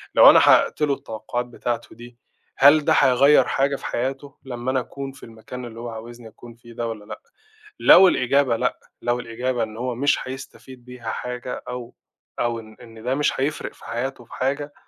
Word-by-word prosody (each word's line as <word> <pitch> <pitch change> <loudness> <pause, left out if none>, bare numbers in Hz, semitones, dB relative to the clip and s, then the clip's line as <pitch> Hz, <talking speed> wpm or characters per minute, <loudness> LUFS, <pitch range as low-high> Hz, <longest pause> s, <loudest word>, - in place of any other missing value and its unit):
لو - - +9
أنا - - +8
حقَّقت - - +4
له 145 -2 +2
التوقُّعات 120 0 -5
بتاعته 120 -1 -5
دي، 120 +1 -13 0.4
هل 145 +2 +6
ده - - +4
هيغيِّر 135 +1 +5
حاجة 140 +1 +1
في - - -9
حياته 135 +3 -4
لمّا 125 -1 -4
أنا 130 - +1
أكون 135 +2 -7
في 135 - -17
المكان 115 +2 -9
اللي 115 -1 -10
هو 120 0 -6
عاوزني 115 +1 -10
أكون 115 +1 -14
فيه 120 0 -15
ده، 115 0 -3
والّا 110 -2 -7
لأ؟ - - -9 0.6
لو 190 0 +8
الإجابة 130 -5 +2
لأ، - - -1 0.2
لو 120 0 0
الإجابة 120 +1 -2
إن 110 0 -7
هو 125 0 -3
مش 140 +3 +2
هيستفيد 130 -1 -10
بيها 125 -2 -8
حاجة، 125 0 -5
أو 125 -1 -7 0.5
أو 120 -1 -1
إن 110 -1 -13
إن 115 -2 -13
ده 130 +2 0
مش 145 -2 0
هيفرِق 145 +3 -2
في - - -17
حياته 120 +1 -4
في - - -16
حاجة، 145 +3 -2
125 Hz, 195 wpm, -22 LUFS, 115-135 Hz, 0.6 s, لو